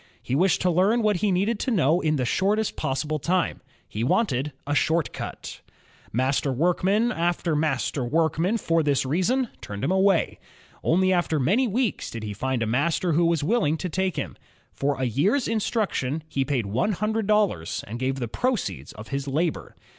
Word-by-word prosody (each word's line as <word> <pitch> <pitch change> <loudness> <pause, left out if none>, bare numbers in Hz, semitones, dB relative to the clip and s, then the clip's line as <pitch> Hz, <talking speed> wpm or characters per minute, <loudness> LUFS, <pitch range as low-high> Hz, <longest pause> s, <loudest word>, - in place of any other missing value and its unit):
He - - -4
wished 180 +6 +3
to 180 - +3
learn 200 +7 +3
what 210 -3 +2
he 205 +3 +1
needed 200 +4 +1
to - - -1
know 170 - +3
in 155 -1 +1
the 130 -3 0
shortest 205 - +1
possible 150 +3 -2
time; 180 +4 0 0.3
he 110 - -4
wanted 140 - +1
a 145 - -1
"short 160 +3 +1
cut.'' - - -7 0.5
Master 135 +3 +1
workman 185 - +2
after 170 -3 0
master 150 -3 0
workman 165 - +1
for 165 -5 +1
this 145 -3 +1
reason 200 - +1
turned 100 0 -6
him - - +1
away. 190 -2 +2 0.4
Only 185 +3 +3
after 175 -3 +1
many 205 - +2
weeks 235 +2 -1
did 115 -1 -7
he 105 -1 -4
find 130 +3 -1
a - - 0
master 150 +9 +1
who 170 +3 +3
was 165 -3 +1
willing 175 -5 +1
to 180 - -4
take 190 +1 -1
him. - - -4 0.3
For 140 -1 -1
a - - -1
year's 175 - +1
instruction, 200 - -1
he 135 -3 -1
paid 130 -6 -1
one 125 - 0
hundred 215 +2 -1
dollars 185 - +1
and 115 +4 -6
gave 130 +1 0
the 125 -3 -3
proceeds 220 - -2
of 110 +1 -11
his 140 0 -3
labor. 155 +4 -2
165 Hz, 185 wpm, -25 LUFS, 135-195 Hz, 0.5 s, wished